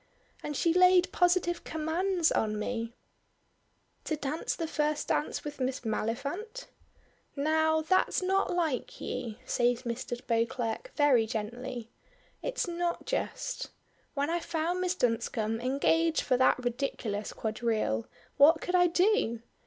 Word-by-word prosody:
And 295 -2 -4
she 335 -2 +2
laid 365 0 +5
positive 355 -1 +2
commands 330 +2 0
on 215 -1 0
me 230 +2 -3 0.5
" - - -43
"To 310 - 0
dance 295 +1 -2
the 330 - -3
first 300 -1 -1
dance 295 - 0
with 295 -1 -7
Miss 260 0 -1
Maliphant?" 280 - -3 0.7
"Now, 315 +2 +2
that's 370 +4 +2
not 385 +1 +1
like 325 -8 -1
you," 245 -4 -4
says 245 0 +1
Mr. 240 0 -4
Beauclerk 230 - -1
very 265 -7 +4
gently. 235 +2 -5 0.5
"It's - - -2
not 345 0 -2
just. - - -3 0.5
When 285 +2 0
I 345 - +1
found 340 +2 -2
Miss 365 0 0
Dunscombe 225 -3 0
engaged 310 +6 +2
for 255 - +1
that 260 +1 +4
ridiculous 235 -4 -2
quadrille, 215 - -1 0.3
what 310 +3 +7
could 360 - -4
I 355 -1 +5
do? 345 - +2
290 Hz, 130 wpm, -30 LUFS, 235-345 Hz, 0.7 s, what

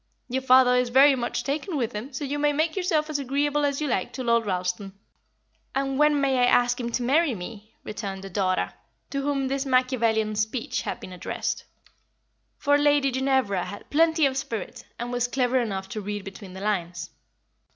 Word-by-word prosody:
Your 260 +2 -1
father 255 -1 +6
is 250 -1 +1
very 270 +3 +7
much 240 -1 -2
taken 305 +4 -2
with 235 -5 -1
him, 220 +7 -6
so 275 +2 -4
you 290 +2 -2
may 295 0 +3
make 315 +2 0
yourself 345 -5 +1
as 305 -2 -2
agreeable 285 +2 0
as 280 -1 0
you 305 - -1
like 190 -8 -1
to 260 - -4
Lord 235 -2 +2
Ralston." 180 +1 -2 0.8
"And 270 0 -1
when 300 -1 +4
may 270 -2 +2
I 245 - +5
ask 245 0 +3
him 235 -1 -3
to 245 - 0
marry 285 +1 +3
me?" 210 +3 -9
returned 200 -3 -5
the 195 - -7
daughter, 185 -1 0 0.4
to 275 - -1
whom 275 -1 0
this 270 +1 -1
Machiavellian 235 -5 +1
speech 230 +5 -1
had - - -4
been 185 - -9
addressed; 180 - -3 0.9
for 285 0 +3
Lady 290 -2 +3
Ginevra 260 -8 +1
had 205 +3 -9
plenty 320 0 +4
of 265 -1 0
spirit, 235 -8 -5
and 240 +1 -4
was 245 0 0
clever 255 0 +1
enough 195 -5 -3
to 215 -1 -4
read 205 0 -4
between 195 -1 -9
the 190 - -8
lines. 180 -4 -2
255 Hz, 195 wpm, -25 LUFS, 215-280 Hz, 0.9 s, very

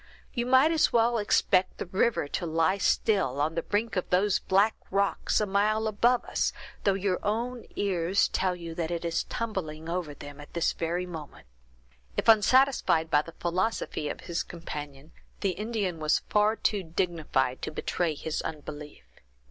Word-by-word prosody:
You 240 -2 -1
might 260 +5 +5
as 320 -2 +3
well 235 0 +3
expect 185 -2 +2
the - - -4
river 190 -2 +1
to 175 +4 -3
lie 165 +4 +1
still 190 - +1
on 155 +2 +1
the 165 - -1
brink 210 +5 -1
of 185 - -2
those 190 +2 +3
black 200 +3 +3 0.2
rocks 200 0 +1
a 210 - +1
mile 210 +2 +1
above 235 +4 +2
us, - - 0 0.3
though 200 -2 +4
your 195 -1 0
own 235 +3 -2
ears 185 -1 +1
tell 185 -1 0
you 170 -2 -7
that 165 -1 -3
it 170 -1 -3
is 165 0 -1
tumbling 165 -9 -4
over 170 -4 -3
them 145 0 -10
at 145 - -14
this 170 - +1
very 170 +2 -2
moment." 155 - -9 0.7
If - - -1
unsatisfied 220 -7 +4
by 150 - +5
the 165 +2 -12
philosophy 175 -3 -1
of - - -6
his 170 -1 -2
companion, 150 -3 -8 0.3
the 195 - +1
Indian 205 -3 -3
was 155 0 +1
far 210 +1 +3
too 210 -2 0
dignified 160 -7 -1
to - - -3
betray 160 +1 -1
his 160 +2 -3
unbelief. 150 - -7
180 Hz, 170 wpm, -28 LUFS, 160-210 Hz, 0.7 s, might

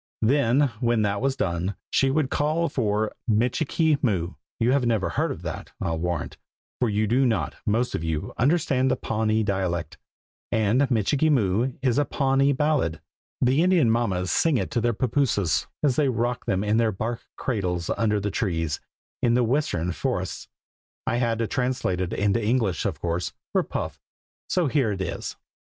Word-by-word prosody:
Then 135 +2 +3
when 120 -3 +2
that 100 0 0
was 135 0 +1
done, 90 0 -1 0.2
she 135 - +3
would 140 0 0
call 155 +3 +1
for 110 -3 0 0.2
"Michikee 140 +7 +2
Moo." 90 - 0 0.3
You 115 +2 +3
have 140 -1 +2
never 115 -5 +1
heard - - -1
that, - - -6
I'll 80 -1 -2
warrant, 85 -3 -3 0.4
for 125 - +2
you 105 +1 +1
do 120 +6 +2
not, 120 -4 0
most 115 +4 +1
of 80 - -2
you, 80 -2 -3
understand 135 -1 +2
the - - +2
Pawnee 110 0 0
dialect, 95 -4 -2 0.5
and 110 +6 +2
"Michikee 135 +6 +2
Moo" 120 -1 +2
is 125 0 +2
a 145 - +2
Pawnee 135 0 +2
ballad. 140 - +1 0.4
The 130 +4 +3
Indian 175 -9 +4
mammas 95 -7 0
sing 160 -5 +3
it - - -2
to 120 - 0
their 120 +1 +1
pappooses, 115 - +1 0.2
as 135 -4 +2
they 145 -3 +3
rock 120 0 -1
them 95 +1 +1
in 105 +1 +2
their 115 -1 +3
bark 115 +4 -3
cradles 90 -8 -2
under 105 -2 +1
the 100 0 -2
trees, 85 - -1 0.4
in 120 -1 +3
the 125 - +3
western 115 - 0
forests. - - -3 0.6
I 120 - 0
had 120 -2 +1
to 115 - 0
translate 125 -7 -1
it 90 - -2
into 105 +3 +1
English, 110 -6 +1
of - - -4
course, 85 0 -2 0.2
for - - +3
Puff; - - -5 0.5
so 180 -2 +2
here 135 -6 +1
it 95 - -5
is. 95 - -4
115 Hz, 175 wpm, -25 LUFS, 100-135 Hz, 0.6 s, Indian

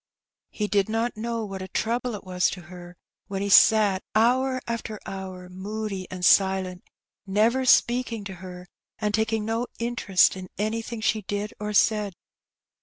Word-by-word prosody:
He 210 - -3
did 200 0 +1
not 225 +2 -1
know 230 0 -3
what 195 -2 -6
a 190 - -5
trouble 235 +3 -1
it 205 - -9
was 180 -1 +1
to 185 - -7
her 175 +1 -12 0.3
when 195 0 -3
he 200 - -2
sat 205 -2 +6
hour 255 +4 +3
after 225 -2 -4
hour 190 -1 -7
moody 195 +1 -5
and 180 -1 -3
silent, 190 -2 +3 0.4
never 225 +7 +2
speaking 240 -3 +3
to 200 -1 -7
her, 180 -1 -9 0.3
and 210 -1 -1
taking 220 0 0
no 225 +2 -1
interest 235 -7 +2
in 185 -1 -8
anything 225 +2 -3
she 215 0 +1
did 205 +1 -4
or 210 0 -3
said. 210 -2 +2
210 Hz, 160 wpm, -25 LUFS, 190-225 Hz, 0.4 s, sat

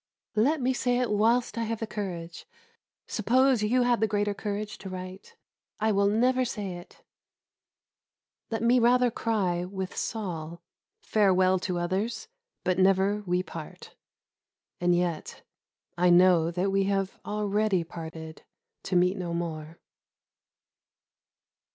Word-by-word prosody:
"Let 280 +9 +3
me 260 0 +1
say 245 -1 0
it 250 -3 0
whilst 230 +3 +2
I - - 0
have 225 0 -3
the 225 - -2
courage." 175 -6 -6 0.6
Suppose 255 +2 +2
you 245 +4 +2
had 245 -1 +2
the 220 - +3
greater 205 0 0
courage 210 +1 -5
to 195 - -8
write, 185 +1 -8 0.4
"I 220 +1 +2
will 200 0 +3
never 250 +5 +2
say 210 -5 -4
it." 175 - -15 1.5
Let 225 -1 -2
me 245 +2 +4
rather 245 +1 +4
cry 195 -7 -1
with 190 0 -5
Saul, 170 -6 -4 0.4
"Farewell 190 -3 +3
to 180 -1 -2
others, 195 +6 -2 0.4
but 185 0 0
never 195 +2 +3
we 180 +1 +1
part." 165 -4 -10 0.8
And 175 0 +3
yet 175 -2 -2 0.6
I 180 0 +4
know 175 -2 +5
that 180 +3 -1
we 195 0 +2
have 195 -1 -1
already 210 -2 0
parted 160 -1 -9 0.4
to - - -2
meet 180 +2 +3
no 175 -2 -3
more. 160 -1 -5
195 Hz, 130 wpm, -27 LUFS, 180-220 Hz, 1.5 s, know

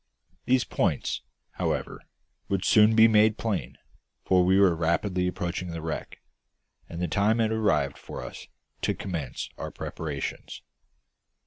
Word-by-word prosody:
These 130 0 +3
points, - - -1 0.3
however, - - -3 0.5
would 100 -1 0
soon 110 +1 +6
be 110 0 +8
made 110 0 +4
plain, 110 -5 -3 0.5
for 90 -1 +4
we 95 +2 +4
were 95 -4 +5
rapidly 90 +3 0
approaching 90 0 -3
the 85 -1 -5
wreck; 80 -1 -5 0.7
and 85 - -6
the 90 - 0
time 100 +7 +2
had 110 -1 +1
arrived 75 -11 +1
for - - -8
us - - -9 0.3
to - - 0
commence 80 -10 -4
our - - -4
preparations. 75 -4 -6
95 Hz, 135 wpm, -27 LUFS, 85-110 Hz, 0.7 s, be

